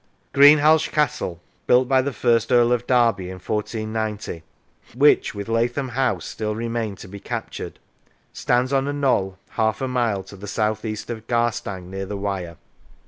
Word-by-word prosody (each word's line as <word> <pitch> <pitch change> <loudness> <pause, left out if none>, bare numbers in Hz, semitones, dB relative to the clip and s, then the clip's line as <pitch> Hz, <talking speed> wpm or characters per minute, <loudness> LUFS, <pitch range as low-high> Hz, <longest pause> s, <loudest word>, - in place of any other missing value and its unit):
Greenhalgh 150 +2 +6
Castle 130 - -1 0.3
(built 125 +1 +4
by 130 0 +4
the 140 +2 -2
first 115 -2 +1
Earl 120 -1 +5
of 120 0 0
Derby 120 -6 +3
in 95 +1 -7
1490), 110 -2 -3 0.5
which, 145 -4 +4
with 100 +1 -5
Lathom 120 +4 0
House, 125 +1 -1
still 105 -1 -4
remained 115 -3 -3
to - - -10
be 100 +2 -9
captured, - - -6 0.6
stands 125 +2 0
on 135 0 +1
a 145 - -1
knoll 115 -10 0
half 110 -1 0
a 130 - -2
mile 120 -6 0
to 95 - -12
the 100 +2 -9
south 110 +1 -1
east 110 +1 -4
of 110 -1 -7
Garstang 105 -6 -1
near 95 0 -5
the 100 0 -4
Wyre. 95 -4 -4
115 Hz, 165 wpm, -22 LUFS, 100-125 Hz, 0.6 s, Greenhalgh